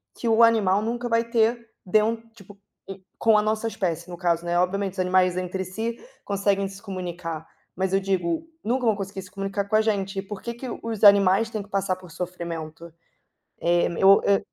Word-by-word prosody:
que 235 - -4
o 225 +1 +4
animal 210 -4 +4
nunca 240 +2 -3
vai 230 0 +2
ter 235 0 +2 0.3
den 215 +4 +3 0.2
tipo, 200 -1 -15 0.3
hum, 195 -1 -8 0.2
com 220 -2 +4
a - - +4
nossa 215 +1 -1
espécie, 175 -4 -3
no 175 - -6
caso, 175 -2 0
né, 175 0 0
obviamente 195 +1 0
os 190 - -9
animais 185 0 +3
entre 185 +1 -3
si 225 +5 -4 0.3
conseguem 200 0 +1
se 195 0 -11
comunicar, 175 -5 -6 0.3
mas, 190 +1 -1
eu 195 - +4
digo, 190 - -1 0.2
nunca 245 +2 0
vão 220 - +3
conseguir 195 -1 -5
se 185 - -15
comunicar 195 0 -3
com 215 - 0
a 215 - +5
gente, 195 -3 -1
e - - -1
por 195 0 -8
que 235 - -4
que 250 +2 -8 0.2
os 225 -2 -4
animais 200 +2 +6
têm 215 -3 -4
que 205 - -19
passar 195 -2 0
por 180 -3 -14
sofrimento? 170 -2 -6 0.7
Eh, 175 0 +3
eu, 195 +1 +7
hã 200 -1 +4
195 Hz, 200 wpm, -24 LUFS, 185-220 Hz, 0.7 s, eu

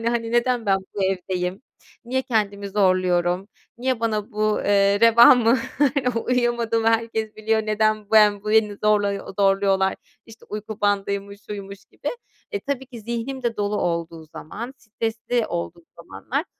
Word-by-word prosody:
Yani, 230 - 0
hani, 230 -1 -2
"Neden 240 -1 +1
ben 195 - +4 0.2
bu 195 -2 0
evdeyim? 185 +2 -2 0.4
Niye 260 +2 -1
kendimi 205 -5 -1
zorluyorum? 185 -1 +1 0.3
Niye 255 -1 -1
bana 220 0 -1
bu, 215 0 0
eee, 200 0 +3
reva 230 +2 +8
mı, 240 +1 +3 0.7
uyuyamadığımı 235 -2 +1
herkes 225 -1 -1
biliyor. 220 0 0
Neden 215 -1 0
ben 210 -2 +5
bu 210 - -3
beni 215 -2 +3
zorla 205 -2 +1
zorluyorlar? 195 -1 +2 0.3
İşte, 225 0 -15
uyku 215 0 -6
bandıymış, 200 0 -1
şuymuş 200 -1 -8
gibi." - - -7 0.4
E, 410 -3 -3
tabii 270 -2 -4
ki 245 -3 -10
zihnim 235 +4 -4
de 235 -1 -1
dolu 205 0 -1
olduğu 170 -1 -3
zaman, 225 - -8
stresli 225 0 -3
olduğum 85 0 -5
zamanlar - - -4
215 Hz, 145 wpm, -23 LUFS, 200-230 Hz, 0.7 s, reva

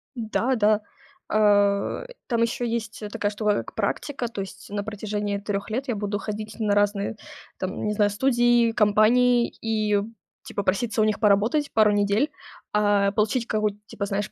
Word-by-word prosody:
Да-да. 220 -2 +1 0.5
А, 205 - +3
э, - - -13
там 235 -2 0
ещё 235 +1 0
есть, 225 -2 -3
э, 205 - -4
такая 205 -2 -2
штука, 210 0 +1
как - - -6
практика. 270 -4 -2
То 205 -4 -5
есть 190 0 -9
на 205 0 -2
протяжении 210 -1 -3
3 200 0 -4
лет 255 +5 -3
я 240 - -1
буду 205 0 -2
ходить 215 0 -6
на 210 -2 +1
разные 205 +1 +1 0.4
там, 185 0 -4
не 210 - 0
знаю, 205 -1 +3
студии, 240 0 +3
компании 235 +3 +4
и 215 -2 +1 0.4
типа 200 - -4
проситься 215 +4 0
у - - +5
них 215 -1 0
поработать 215 +8 +2
пару 215 -1 +5
недель, 205 +7 +1 0.4
а, 205 -1 +3
получить 215 +4 0
какую-то 215 -2 -1
типа, 200 - -5
знаешь, 200 0 -3
210 Hz, 170 wpm, -24 LUFS, 205-230 Hz, 0.5 s, у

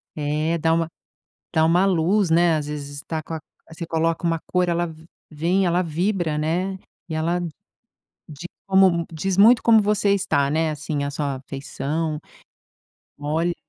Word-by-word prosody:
É, 155 +2 -1
dá 160 0 +2
uma 165 -1 +1 0.7
dá 160 -1 +4
uma 175 +4 +4
luz, 185 +1 +2
né, 170 0 +4
às 150 -1 -4
vezes 145 -1 -6
tá 160 -1 -2
com 165 - -8
a 160 - -3 0.3
você 165 +1 -6
coloca 165 +1 -1
uma 165 -1 +1
cor, 180 -1 +1
ela 170 -1 -1 0.4
vem, 175 +5 +1
ela 175 +1 +2
vibra, 170 -1 -1
né. 180 +5 -1 0.3
E - - -4
ela 170 +3 0 0.9
de 155 +3 -8 0.2
como 190 -3 +4
diz 185 +4 -2
muito 225 +3 +6
como 225 -2 +6
você 205 -1 +2
está, 145 -8 +1
né, 160 +1 +1
assim, 150 -1 -3
a 140 - -2
sua 140 -2 -3
feição. 150 +3 -3 1.0
Olha! 160 +4 -1
165 Hz, 160 wpm, -23 LUFS, 155-180 Hz, 1.0 s, muito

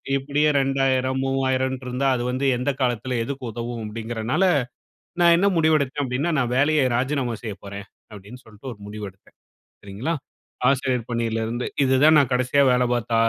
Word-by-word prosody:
"இப்படியே 145 +2 +1
2000 135 -1 +1
3000ட்டு 130 -1 -1
இருந்தா, 125 +2 -1
அது 120 - -2
வந்து 130 +2 -1
எந்த 125 +3 0
காலத்துல, 125 0 -1
எதுக்கு 135 +2 -6
உதவும்?"அப்படிங்கிறதுனால, 115 - -3 0.8
நான் 170 -1 +6
என்ன 195 +4 +3
முடிவெடுத்தேன் 150 -3 +2
அப்படின்னா, 135 +6 -1
"நான் 125 -3 0
வேலைய 145 0 +3
ராஜினாமா 130 -1 -1
செய்ய 110 -4 -5
போறேன்." 100 0 -8 0.3
அப்படின்னு 105 +5 -12
சொல்லிட்டு 110 +4 -10
ஒரு 105 - -14
முடிவு 105 0 -7
எடுத்தேன், 95 +1 -27 0.4
சரிங்களா? 105 +12 -4 0.6
ஆசிரியர் 130 -3 -1
பணியிலிருந்து, 115 0 -2 0.2
இதுதான் 140 +4 +5
நான் 135 -3 0
கடைசியா 130 +3 +2
வேலை 125 0 +2
பார்த்த, 120 -1 -2
130 Hz, 145 wpm, -23 LUFS, 115-135 Hz, 0.8 s, நான்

